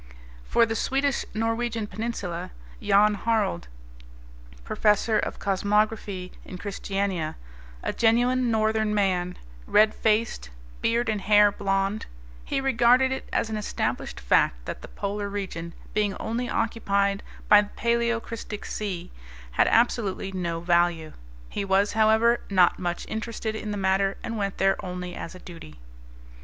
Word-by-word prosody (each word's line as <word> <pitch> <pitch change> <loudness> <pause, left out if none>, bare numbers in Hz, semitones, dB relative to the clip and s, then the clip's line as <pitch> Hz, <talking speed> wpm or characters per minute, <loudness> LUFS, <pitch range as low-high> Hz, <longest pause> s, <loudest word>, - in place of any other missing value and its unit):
For 230 - +4
the 225 0 -3
Swedish 275 +3 0
Norwegian 225 0 -1
peninsula 210 -6 -4 0.3
Jan 210 +1 +4
Harald, 205 - 0 1.0
Professor 210 - +2
of - - -3
Cosmography 200 -1 0
in 185 - -8
Christiania; 195 -4 -2 0.5
a - - -1
genuine 245 +2 +3
Northern 220 -1 +1
man, 180 -3 0 0.3
red 215 +1 +5
faced, 215 - 0 0.3
beard 235 +1 +1
and 215 -2 -1
hair 210 +1 +5
blond; 195 +1 -1 0.4
he 275 - -1
regarded 260 0 +4
it 265 - -4
as 220 - 0
an 215 - -2
established 210 - -3
fact - - +2
that - - -6
the - - -9
Polar 200 0 -4
region, 185 -4 -5 0.2
being 205 -2 +1
only 240 +2 -3
occupied 200 -3 0 0.3
by 210 0 +8
the 205 - -7
Paleocristic 235 -2 -1
Sea, 195 -5 -4 0.4
had - - +3
absolutely 220 -4 +1
no 170 -3 -3
value. 170 -2 +1 0.3
He 200 - -3
was, 195 +1 +2
however, 220 +2 +4
not 185 -3 +4
much 175 -1 -3
interested 220 0 -4
in 220 -1 -5
the 205 - -2
matter 195 0 +1
and 230 - -4
went 200 -2 -2
there 195 0 +2
only 180 -1 -5
as 165 - -7
a - - -10
duty. 165 - -11
210 Hz, 135 wpm, -26 LUFS, 190-225 Hz, 1.0 s, by